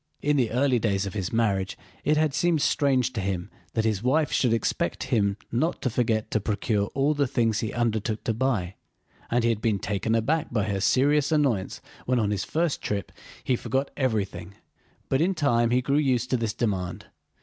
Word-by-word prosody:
In 150 +1 +2
the 125 -5 +2
early 125 +1 +2
days 100 -3 0
of 100 - -5
his 95 -4 -3
marriage 100 -5 0 0.3
it 150 +1 +2
had 155 -2 +2
seemed 165 -1 +2
strange 130 -5 +2
to 110 - -2
him 95 -2 -3 0.2
that 110 - 0
his 110 -3 0
wife 145 +5 +2
should 125 - +2
expect 110 -6 -1
him 100 -3 +2
not 145 +9 0
to 130 - 0
forget 110 -2 0
to 110 - +2
procure 105 0 0
all 140 +2 +2
the 145 -2 +1
things 115 -3 +1
he 110 - -2
undertook 110 -2 -1
to 115 - 0
buy, 110 -7 -1 0.6
and 120 0 +1
he 115 - +3
had 110 -2 -3
been 110 -3 +1
taken 105 +3 -1
aback 145 +8 +1
by 110 -4 +1
her 100 -2 -2
serious 140 +6 +3
annoyance 135 -11 +1 0.3
when 125 0 +2
on 105 -3 +1
his 100 -2 -1
first 165 -1 -1
trip 100 -2 -3 0.3
he 130 - +1
forgot 135 +3 -2
everything. 100 -7 -2 0.5
But 135 - +1
in 185 +3 +2
time 120 -7 +2
he 125 +1 +2
grew 140 +2 +1
used 125 -4 +1
to 130 - +3
this 115 -3 -2
demand. 95 -7 -2
115 Hz, 200 wpm, -26 LUFS, 105-135 Hz, 0.6 s, he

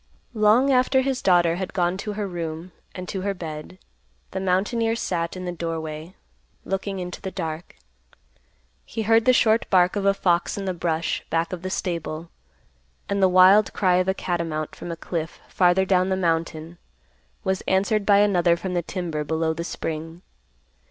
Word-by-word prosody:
Long 225 +5 +4
after 260 +1 +3
his 265 -1 -1
daughter 175 -2 +3
had 190 0 -4
gone 175 -1 +1
to 210 +1 -4
her 205 -1 -3
room 170 -1 -5 0.2
and 185 -1 -6
to 190 - -4
her 200 +1 -2
bed, 160 0 -7 0.5
the 190 - -3
mountaineer 210 +5 +1
sat 170 -5 -2
in 185 - -6
the 175 - -2
doorway, 165 0 -5 0.5
looking 195 0 -3
into 180 -1 -6
the 190 - -4
dark. 165 -3 -6 1.1
He 225 - -4
heard 225 +1 +4
the 255 - +6
short 225 -2 +3
bark 180 -1 +4
of 200 -1 -1
a 195 - +4
fox 175 -1 +1
in 200 - -4
the 185 - -1
brush 165 -1 -2
back 165 +2 0
of 175 - -5
the 185 - -4
stable; 170 -3 -4 0.8
and 200 0 -1
the 190 - +5
wild 185 +3 +6
cry 185 -3 +2
of 185 0 +1
a 190 - +1
catamount 165 -5 -3
from 175 - -7
a 165 - -5
cliff 165 -1 -4
farther 180 +1 +3
down 185 -1 +2
the 190 - 0
mountain 165 -1 -2 0.6
was 190 -2 0
answered 200 +3 +2
by 200 0 +5
another 175 -4 +3
from 185 +1 -4
the 175 - +1
timber 165 -3 -4
below 160 +2 0
the 165 +1 -4
spring. 165 0 -5
180 Hz, 180 wpm, -24 LUFS, 170-195 Hz, 1.1 s, the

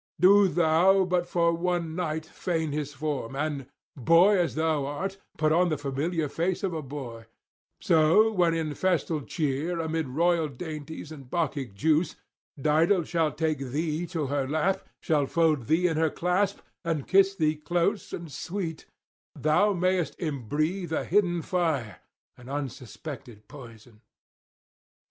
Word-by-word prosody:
Do 200 +2 +7
thou 175 +3 +4
but 180 -1 0
for 170 -1 +2
one 170 -1 -1
night 160 -3 -2
feign 160 -2 -2
his 145 -1 -3
form, 140 -3 -4
and, 145 -2 -3 0.3
boy 165 - +5
as 175 - 0
thou 155 -3 0
art, 190 +7 -4 0.2
put 155 -1 +2
on 175 +2 +3
the 155 - 0
familiar 145 +4 -2
face 175 +6 -2
of 190 -3 -1
a 160 - -3
boy; 125 -5 -8 0.5
so 165 +7 +4
when 175 -5 +2
in 160 -2 -2
festal 170 -3 0
cheer, 155 +3 -2
amid 160 -2 -2
royal 165 +4 +1
dainties 155 +2 -7
and 140 -5 -11
Bacchic 140 - -2
juice, 155 - +1 0.4
Dido 160 +6 +3
shall 160 -1 0
take 155 -1 -1
thee 155 +5 -2
to 165 -5 -2
her 140 -1 -1
lap, 160 +6 0 0.2
shall 150 -4 +1
fold 155 -7 +1
thee 160 +4 +2
in 160 -3 -1
her 160 0 +3
clasp 180 +5 0 0.2
and 165 -5 -2
kiss 195 0 +4
thee 155 -4 +1
close 175 +6 -1
and 170 -3 -6
sweet, 170 -1 -5 0.5
thou 175 +8 +3
mayest 185 -2 0
imbreathe 155 - -2
a 160 - -1
hidden 175 -3 +1
fire 155 - -1 0.4
and 125 +1 -13
unsuspected 130 -4 -7
poison.' 115 -5 -13
160 Hz, 145 wpm, -27 LUFS, 145-175 Hz, 0.5 s, Do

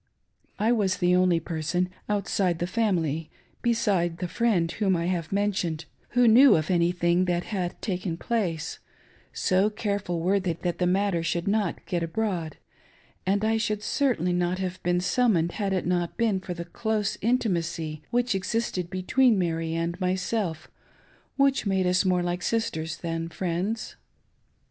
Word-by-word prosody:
I 220 +3 +2
was 195 -6 +1
the 180 0 +3
only 180 -2 +3
person, 165 +3 -1 0.2
outside 195 -3 0
the 175 - -1
family, 170 -7 0 0.3
beside 200 -8 +1
the 180 - -3
friend 180 -5 +1
whom 195 -4 +1
I 170 - -1
have 175 -3 -2
mentioned, 195 -6 -1 0.3
who 245 -1 +6
knew 255 +5 +8
of 155 +1 0
any 170 -1 +3
thing 175 0 +2
that 175 -1 0
had 185 -4 -3
taken 180 -4 -2
place 175 -8 -2 0.3
— - - -31 0.2
so 190 +3 +4
easeful 200 -5 -2
were 190 +4 +2
they 185 -3 -1
that 170 +1 -3
the 180 - +2
matter 190 -1 +1
should 170 +2 -2
not 205 -3 0
get 175 -3 -1
abroad; 170 -2 -2 0.7
and 200 +2 +2
I 225 0 +2
should 215 -2 -1
certainly 225 - +1
not 175 +1 0
have 185 -1 -4
been 175 0 +1
summoned 185 -5 +2
had 200 0 -2
it 185 -1 0
not 175 -1 -1
been 220 -5 +2
for 180 -1 -6
the 170 0 -6
close 215 +3 -1
intimacy 170 -9 -1
which 245 -1 +1
existed 190 -2 -2
between 215 +6 +3
Mary 165 -2 -1
and 170 +2 -2
myself, 185 -2 -1 0.7
which 275 -5 +2
made 190 -1 +1
us 180 +1 +3
more 180 -1 +2
like 175 +1 -2
sisters 160 -8 -1
than 165 -1 -3
friends. 185 +6 -3
185 Hz, 160 wpm, -26 LUFS, 170-210 Hz, 0.7 s, knew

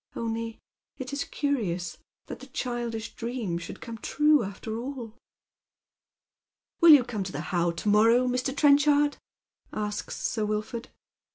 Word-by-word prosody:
Only 230 0 -3 0.4
it 260 0 -6
is 280 - -2
curious 185 - -2 0.3
that - - -8
the 265 - -11
childish 240 -3 -4
dream 230 -8 -3
should 170 - -9
come 230 -2 -7
trae 300 +6 +3
aftei* 220 +3 -6 0.2
all." 230 -3 -8 1.6
"Will 340 - +7
you 290 -5 +10
come 225 -5 -3
to 185 - -6
the - - -4
How 175 -1 +2
to 170 +5 -5
morrow," 225 +4 +5
Mr. 255 +2 -1
Trench 290 0 +5
ard?" 290 0 +3 0.5
asks 210 -1 -4
Sir 220 - -1
Wilford. 215 +2 -3
230 Hz, 145 wpm, -27 LUFS, 210-265 Hz, 1.6 s, you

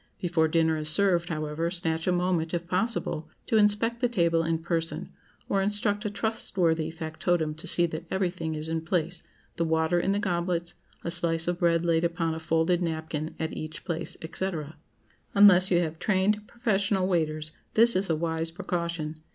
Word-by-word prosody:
Before 170 -3 +2
dinner 160 0 +2
is 155 0 0
served, 175 0 +2
however, 155 +1 -2
snatch 165 -2 -1
a - - +4
moment, 175 -2 0
if 170 0 -4
possible, 185 -4 -1 0.2
to 225 - +2
inspect 215 +3 +3
the 245 - +2
table 170 -7 +2
in 165 0 0
person, 165 0 -3 0.3
or 195 - +1
instruct 205 +1 0
a - - +1
trustworthy 180 -7 0
factotum 160 0 -1
to 160 - -6
see 175 - +3
that 165 0 -5
everything 175 -4 -1
is 155 +1 -4
in 165 0 -1
place, 170 +1 -1 0.4
the 170 - +1
water 160 +1 +2
in 190 - +1
the 200 - +1
goblets, 175 -3 -1 0.3
a 170 - -2
slice 170 -1 +1
of 175 0 -1
bread 170 -1 +2
laid 165 -1 +2
upon 170 -1 0
a 160 - -5
folded 165 +2 +1
napkin 160 -2 -3
at 160 0 -3
each 155 0 -7
plate, 170 -3 -3 0.2
&c. 190 +1 -1 0.8
Unless 195 -2 +7
you 175 - +3
have 160 -1 -3
trained, 210 +1 +1
professional 200 -5 0
waiters, 155 -4 0 0.2
this 235 +2 +6
is 190 0 +1
a 160 - +2
wise 160 0 -1
precaution. 170 -2 -4
170 Hz, 175 wpm, -27 LUFS, 160-190 Hz, 0.8 s, Unless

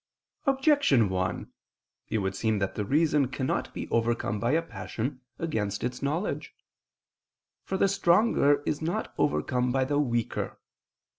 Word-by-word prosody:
Objection 270 - +4
1: 90 0 -2 0.6
It - - 0
would 95 -2 -1
seem 110 +1 +1
that 100 -1 -1
the 105 - -2
reason 145 +3 +2
cannot 130 +1 -2
be - - -5
overcome 115 -2 0
by 120 +6 +1
a 165 - +3
passion, 130 -4 -5 0.2
against 105 -11 -2
its 125 0 -3
knowledge. 155 +8 -2 1.1
For 190 - -3
the 195 - +4
stronger 175 -6 +3
is 145 - -1
not 165 +2 -2
overcome 125 - +1
by 130 +1 +2
the 145 +2 +1
weaker. 120 -5 -1
130 Hz, 140 wpm, -28 LUFS, 110-160 Hz, 1.1 s, Objection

